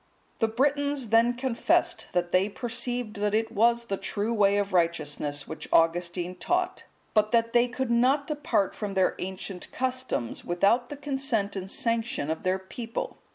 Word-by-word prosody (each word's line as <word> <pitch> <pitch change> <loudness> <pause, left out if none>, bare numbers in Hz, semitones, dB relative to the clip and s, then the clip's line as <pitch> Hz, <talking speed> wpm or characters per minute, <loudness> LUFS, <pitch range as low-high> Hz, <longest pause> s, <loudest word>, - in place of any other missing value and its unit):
The 225 - +3
Britons 285 +1 0
then 230 +2 +4
confessed 250 -1 +1
that 175 -1 0
they 185 +3 +3
perceived 240 0 -2
that 210 +1 0
it 225 0 0
was 235 +2 +3
the 195 -4 -2
true 210 +4 -2
way 200 -2 +3
of 200 -1 -1
righteousness 150 -4 0
which 160 -1 -6
Augustine 175 +2 +2
taught; 360 - -1 0.3
but 215 -1 +3
that 230 0 +2
they 240 0 +5
could 250 0 -3
not 260 +5 +3
depart 295 - 0
from 205 -2 -5
their 190 -1 +3
ancient 190 0 -5
customs 255 - -2
without 200 +8 +2
the 290 - -6
consent 270 -8 -1
and 190 -1 -5
sanction 230 -9 -1
of 160 - -3
their 185 0 +1
people. 225 +5 -6
225 Hz, 160 wpm, -27 LUFS, 190-245 Hz, 0.3 s, they